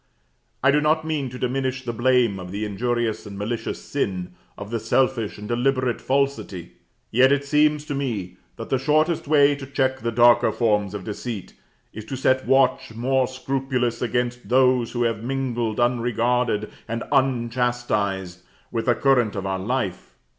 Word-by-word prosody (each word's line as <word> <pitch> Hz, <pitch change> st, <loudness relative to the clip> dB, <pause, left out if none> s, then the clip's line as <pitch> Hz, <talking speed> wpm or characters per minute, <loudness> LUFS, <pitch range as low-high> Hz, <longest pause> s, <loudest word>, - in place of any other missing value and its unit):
I 140 Hz, -, +6 dB
do 150 Hz, +1 st, +3 dB
not 155 Hz, +1 st, +2 dB
mean 150 Hz, -4 st, -2 dB
to 125 Hz, -, -8 dB
diminish 130 Hz, +1 st, -2 dB
the 120 Hz, -, -3 dB
blame 120 Hz, -4 st, +2 dB
of 90 Hz, -1 st, -8 dB
the 105 Hz, +2 st, -3 dB
injurious 115 Hz, +1 st, -2 dB
and 100 Hz, -1 st, -8 dB
malicious 110 Hz, +3 st, -3 dB
sin, 95 Hz, -10 st, -3 dB, 0.2 s
of 100 Hz, +1 st, -8 dB
the 115 Hz, -, -1 dB
selfish 115 Hz, 0 st, 0 dB
and 105 Hz, 0 st, -8 dB
deliberate 125 Hz, +1 st, 0 dB
falsity; 135 Hz, -10 st, -1 dB, 0.4 s
yet 130 Hz, +3 st, +5 dB
it 140 Hz, 0 st, +1 dB
seems 150 Hz, +1 st, +2 dB
to 145 Hz, -, -4 dB
me, 110 Hz, -10 st, -3 dB, 0.2 s
that -, -, -8 dB
the 135 Hz, -, +2 dB
shortest 155 Hz, +4 st, +1 dB
way 145 Hz, -1 st, +5 dB
to 140 Hz, -1 st, -8 dB
check 130 Hz, -1 st, 0 dB
the 115 Hz, -1 st, -2 dB
darker 120 Hz, +1 st, +5 dB
forms 105 Hz, -4 st, 0 dB
of 100 Hz, -, -6 dB
deceit 105 Hz, -1 st, -6 dB, 0.4 s
is 110 Hz, -, -7 dB
to 135 Hz, -, -5 dB
set 130 Hz, 0 st, +1 dB
watch 130 Hz, -4 st, +2 dB
more 130 Hz, +2 st, +1 dB
scrupulous 130 Hz, -2 st, -2 dB
against 125 Hz, 0 st, -2 dB
those 125 Hz, -2 st, +3 dB
which 120 Hz, 0 st, +1 dB
have 115 Hz, -1 st, -1 dB
mingled, 120 Hz, -4 st, -2 dB
unregarded 120 Hz, -2 st, +1 dB, 0.2 s
and 115 Hz, +1 st, -3 dB
unchastised, 120 Hz, -8 st, 0 dB, 0.3 s
with 115 Hz, 0 st, -2 dB
the 120 Hz, -, +4 dB
current 125 Hz, -6 st, +2 dB
of 100 Hz, -1 st, -4 dB
our 95 Hz, -1 st, -2 dB
life. 105 Hz, -3 st, -3 dB
120 Hz, 165 wpm, -23 LUFS, 110-135 Hz, 0.4 s, I